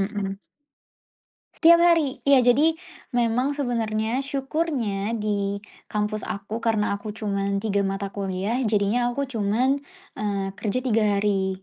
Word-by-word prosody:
mhm. 195 -1 -2 1.2
Setiap 335 0 +6
hari. 330 -6 +3
Iya, 255 -3 +6
jadi 310 +6 +4 0.4
memang 245 +4 +1
sebenarnya, 230 -3 -1
syukurnya, 265 -7 -2
di 200 -2 -2 0.2
kampus 210 0 -2
aku 200 +3 -4
karena 215 -3 0
aku 210 0 -7
cuman 200 -2 -2
3 200 -2 +1
mata 195 0 -3
kuliah 195 +3 -2
jadinya 215 +3 +1
aku 280 - -1
cuman, 250 +2 +1 0.4
eee, 200 -2 -2
kerja 240 +4 -1
3 225 -4 +2 0.2
hari 190 -2 0
215 Hz, 125 wpm, -24 LUFS, 200-255 Hz, 1.2 s, Setiap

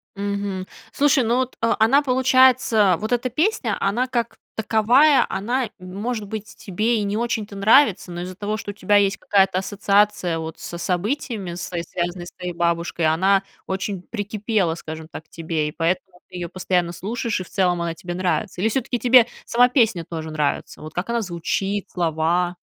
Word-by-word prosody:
Мгм, 200 -2 -3 0.2
слушай, 285 -2 +3
ну 235 +2 +1
вот, 255 0 -2
а, 230 0 +2
она 240 +6 +5
получается, 255 -7 +4
вот 215 +2 -4
эта 245 +1 +1
песня, 290 - 0
она 230 +6 0
как 235 -3 -2 0.2
таковая, 240 +6 +4
она, 235 +5 -1
может 205 +4 -4
быть, 215 0 -7
тебе 215 +5 -1
и - - -1
не 205 +1 -1
очень-то 220 -3 -2
нравится, 210 -1 +4
но 175 0 -5
из-за 185 +1 -6
того, 205 +2 -3
что 215 - -7
у - - -4
тебя 205 +1 +3
есть 200 -1 +2
какая-то 195 -2 +2
ассоциация 200 -3 +1
вот 160 0 -6
с 170 - -7
событиями, 195 +1 -2
с 175 - -6 0.2
связанными 175 0 -3
с - - -10
твоей 180 -1 -6
бабушкой, 170 -1 0
она 190 +5 +3 0.2
очень 190 -1 -3
прикипела, 205 -4 -1
скажем 160 -1 -8
так, 160 - -8
к - - -37
тебе, 160 -2 -2
и - - -4
поэтому 180 +3 -2
ты 185 - -12
её 175 -2 -4
постоянно 180 -2 0
слушаешь, 215 +5 -3
и 185 - -4
в - - -16
целом 180 -3 +1
она 170 -1 -2
тебе 175 +1 -6
нравится. 185 +1 -2
Или 220 - +2
всё-таки 245 +1 -1
тебе 245 0 +6 0.2
сама 245 +1 +4
песня 225 - +2
тоже 160 -1 -5
нравится, 150 -2 -2
вот 155 0 -9
как 180 +5 -3
она 235 0 0
звучит, 195 +2 -2
слова? 175 +1 0
200 Hz, 180 wpm, -22 LUFS, 175-230 Hz, 0.2 s, тебе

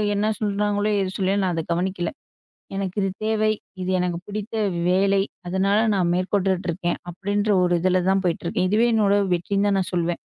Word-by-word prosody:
என்ன 210 +2 +1
சொல்றாங்களோ? 205 0 0
ஏது 190 -1 -2
சொல்லயோ, 195 +1 +1
நான் 180 - 0
அத 165 - -1
கவனிக்கல. 175 0 -1 0.7
"எனக்கு 195 0 -3
இது 195 - +1 0.2
தேவை, 215 0 +2 0.3
இது 180 - -3
எனக்கு 175 -1 -1
பிடித்த 215 +2 -5 0.3
வேலை." 195 +1 +3 0.3
அதனால, 195 +3 +2 0.2
நான் 175 -2 +1
மேற்கொண்டுட்டுருக்கேன். 185 -2 -1
அப்டின்ற 205 +4 -1
ஒரு 175 0 +2
இதுல 185 0 +2
தான் 195 0 +1
போயிட்டுருக்கேன். 175 +1 0
இதுவே 230 +3 +4
என்னோட 205 -2 +3 0.2
வெற்றின்னு 200 +4 0
தான் 195 -1 +2
நான் 185 - -3
சொல்வேன். 175 0 0
195 Hz, 165 wpm, -23 LUFS, 180-205 Hz, 0.7 s, இதுவே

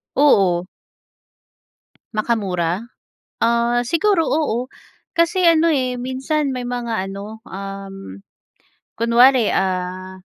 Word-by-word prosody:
Oo. 190 -11 +4 1.5
Makamura? 200 -3 -1 0.6
Ah, 235 +1 +2
siguro, 340 +1 +2
oo. 255 -5 0 0.5
Kasi 345 +2 +2
ano, 330 0 +4
eh, 255 -2 0
minsan 265 +4 -2
may 250 -1 -4
mga 235 -5 -3
ano, 205 +3 -8
um, 195 - -8 0.8
kunwari, 235 +1 +4
ah, 185 0 -2
235 Hz, 85 wpm, -20 LUFS, 195-265 Hz, 1.5 s, Oo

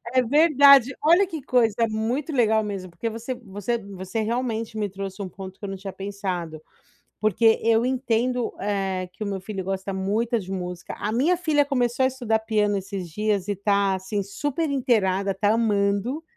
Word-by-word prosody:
É 255 -1 +4
verdade. 280 -1 +6
Olha 340 +6 +5
que 325 -4 -6
coisa, 230 -3 +2
muito 235 +8 -2
legal 220 -5 +3
mesmo, 195 -3 -5
porque 170 +7 -4
você 230 +3 -5
você 210 0 -4
você 195 +1 -5
realmente 225 -1 -2
me 210 -1 -1
trouxe 195 +1 -6
um 190 - -4
ponto 190 +1 -10
que - - -10
eu 200 - -4
não 195 - -4
tinha 195 0 -7
pensado. 185 -5 -4 0.6
Porque 220 +2 +3
eu 230 +1 +3
entendo, 250 -1 0
eh, 195 -2 -2
que - - -9
o - - -2
meu 195 -1 -3
filho 195 0 -5
gosta 195 +1 -3
muito 215 +5 0
de 190 -1 -9
música, 180 -2 -5
a 210 - -2
minha 305 +10 +2
filha 310 -5 +2
começou 250 -3 0
a - - +5
estudar 240 -4 -1
piano 210 -2 +1
esses 195 -2 -5
dias 205 +2 -1
e 205 - -1
tá, 200 0 +1
assim, 190 +2 -3
super 290 - -2
inteirada, 200 -8 +1
tá 205 +2 +1
amando. 215 +5 +1
215 Hz, 185 wpm, -24 LUFS, 195-245 Hz, 0.6 s, verdade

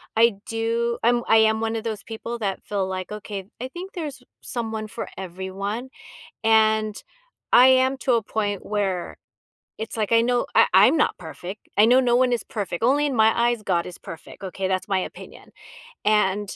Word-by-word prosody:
I 230 0 +5
do 230 +1 -1
I'm 240 +1 +3
I 225 - +6
am 220 0 +4
one 225 0 -1
of 225 - -3
those 215 -3 -4
people 230 +1 -6
that 195 -3 -3
feel 195 -2 -2
like, 185 0 -5
"Okay. 205 -2 -6 0.2
I 255 - -3
think 365 +7 -8
there's 300 -7 -6 0.2
someone 220 -3 -4
for - - -6
everyone." 190 +6 -5 0.5
And 220 -1 +3 0.6
I 250 +1 +8
am 260 +1 +4
to 260 - +1
a 230 -2 +2
point 205 -2 -3
where 195 -4 -2 0.6
it's 220 +2 -5
like, 220 0 -1
I 230 - +6
know 245 +1 +1
I - - +6
I'm 210 +11 +7
not 300 - +1
perfect. 180 +4 -9
I 210 - +7
know 250 +3 +6
no 240 -2 +3
one 250 0 +3
is 240 - -1
perfect. 200 -4 -5
Only 285 +4 +3
in 270 - -2
my 220 0 +5 0.2
eyes, 240 -3 -1
God 175 -4 0
is 180 - -9
perfect. 165 +4 -11
Okay, 190 0 -3
that's 185 0 -2
my 195 -1 +1
opinion, 185 - -8 0.6
and 205 -1 +1
220 Hz, 190 wpm, -23 LUFS, 200-240 Hz, 0.6 s, I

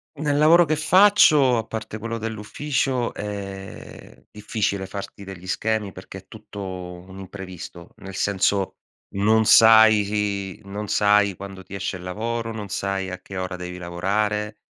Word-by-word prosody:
Nel 145 -1 -1
lavoro 165 +3 +6
che 155 - 0
faccio, 155 - +5
a 110 - -1
parte 110 -1 -6
quello 115 +1 -5
dell'ufficio, 120 +4 -2
è 100 -2 -8
difficile 105 -2 -2
farti 100 +1 -8
degli 95 -2 -10
schemi 105 +1 -1
perché 95 +1 -10
è 95 - -20
tutto 105 -1 -10
un 90 0 -8
imprevisto, 95 -3 -10
nel 95 0 -10
senso: 100 0 0 0.4
non 110 +3 +3
sai 105 -3 +5
i - - -22
non 100 +2 -6
sai 105 -1 +3
quando 95 0 -9
ti 95 - -14
esce 100 0 -3
il 90 - -12
lavoro, 115 +5 -3
non 105 -2 -6
sai 95 -1 -2
a 90 - -5
che 100 +1 -9
ora 90 0 -3
devi 90 0 -7
lavorare, 105 +4 -2
100 Hz, 150 wpm, -23 LUFS, 95-110 Hz, 0.4 s, lavoro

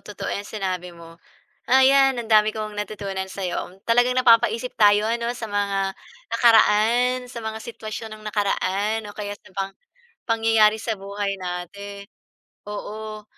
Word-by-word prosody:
totoo 210 - -6
'yan 205 0 -4
sinabi 185 -4 -3
mo. 165 0 -14 0.5
Ah, 260 +1 +6
'yan, 270 -1 +5
ang 235 -2 -4
dami 215 -1 +5
kong 215 -1 -5
natutunan 200 -2 -4
sa 190 0 -5
'yo. 180 +1 -4
Talagang 245 +2 +3
napapaisip 235 0 +4
tayo 210 0 +5
'no, 235 0 -2
sa 225 - -5
mga 200 -1 -1 0.4
nakaraan, 235 +2 +4
sa 240 - -7
mga 220 -1 -5
sitwasyon 220 -1 -7
ng 215 - -16
nakaraan, 205 +1 -1
o 205 - -9
kaya 205 -1 -5
sa 185 - -20
pang 195 0 -2 0.6
pangyayari 225 -2 +4
sa 220 -3 -2
buhay 200 0 -4
natin. 190 +3 -6 0.7
Oo. 215 +1 -6
215 Hz, 150 wpm, -23 LUFS, 200-225 Hz, 0.7 s, Ah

